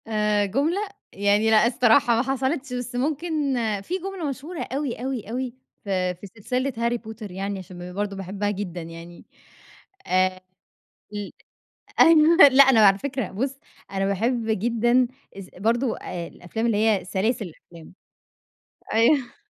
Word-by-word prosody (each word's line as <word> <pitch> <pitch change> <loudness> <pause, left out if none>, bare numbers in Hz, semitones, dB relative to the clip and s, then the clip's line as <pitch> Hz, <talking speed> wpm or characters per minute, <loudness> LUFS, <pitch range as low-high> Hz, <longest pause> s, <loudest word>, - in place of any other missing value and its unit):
آآ، 210 -1 +1
جملة 280 - 0 0.4
يعني 205 +2 +2
لأ 220 +1 +5
الصراحة 240 0 +4
ما 230 - +2
حصلتش، 265 +1 -2
بس 245 0 -5
ممكن 295 +1 -1 0.3
في 270 - -7
جملة 375 -4 -4
مشهورة 295 +6 -6
أوي 275 -2 -3
أوي 250 -4 -5
أوي 250 +1 -3 0.3
في 185 -2 -1
في 190 +4 -11
سلسلة 250 +7 -3
Harry 235 0 -1
Potter 220 -2 -8
يعني، 195 +2 -4
عشان 180 -1 -9
ب - - -12
برضه 205 0 -2
باحبها 195 +2 -3
جدًا 185 -4 -5
يعني. 165 +1 -11 0.8
آآ، 185 0 +1 0.7
ال 205 -1 -5 0.7
أ - - +11
أيوه، 325 0 +6
لأ 270 +1 +8
أنا 265 -4 +5
على 195 0 +5
فكرة، 265 +2 -3
بُص 265 +7 -3 0.3
أنا 195 0 0
باحِب 230 +5 0 0.2
جدًا 240 +2 +2 0.3
از 190 -2 -10
برضه 230 +5 0
الأفلام 175 +5 -5
اللي 230 -3 +1
هي 215 -3 +2
سلاسِل 210 +4 -1
الأفلام. 165 +1 -16 1.0
أيوه. 240 +4 +2
225 Hz, 145 wpm, -24 LUFS, 195-260 Hz, 1.0 s, أ